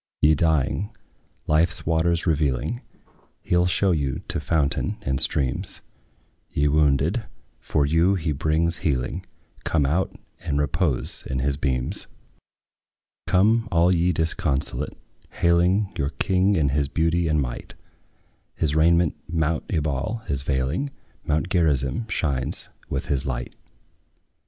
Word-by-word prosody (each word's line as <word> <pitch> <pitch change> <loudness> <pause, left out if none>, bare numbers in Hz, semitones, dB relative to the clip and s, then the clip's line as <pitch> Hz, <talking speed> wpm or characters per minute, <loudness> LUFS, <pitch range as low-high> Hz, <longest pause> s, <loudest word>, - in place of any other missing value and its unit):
Ye 75 +1 +5
dying, 80 +5 +1 0.6
life's 80 +3 +2
waters 80 +1 +1
revealing, 80 - 0 0.6
He - - 0
'll 90 0 +4
show 95 +1 +2
you 70 -6 -1
to - - +3
fountain 80 +6 0
and 65 -5 0
streams: 65 -4 -1 0.7
Ye 75 +1 +1
wounded, 75 - +2 0.3
for 70 - 0
you 85 +6 +3
he 80 -4 -1
brings 80 +3 +1
healing; 65 -6 -1 0.4
Come 75 -4 +1
out 85 +7 0 0.2
and 75 -5 -2
repose 75 -1 -1
in 65 - -2
his 70 +2 +1
beams. 65 -3 -2 1.2
Come, 110 +5 +3
all 85 +2 +4
ye 90 +1 +2
disconsolate, 75 -4 -1 0.4
hailing 90 +4 +2
Your 70 - -1
King 95 +4 +2
in 75 -5 +2
his 70 +1 +1
beauty 80 +3 +1
and 75 -1 +2
might; 60 -4 -4 0.8
His 75 -1 0
raiment 85 0 +3
mount 80 -1 0
Ebal 75 - -1
is 70 -2 -1
veiling; 70 - -1 0.4
Mount 75 +2 +1
Gerizim 80 - +1
shines 70 -9 0 0.2
with - - -2
his 70 -1 -1
light. 60 -2 -4
80 Hz, 125 wpm, -24 LUFS, 70-85 Hz, 1.2 s, Ye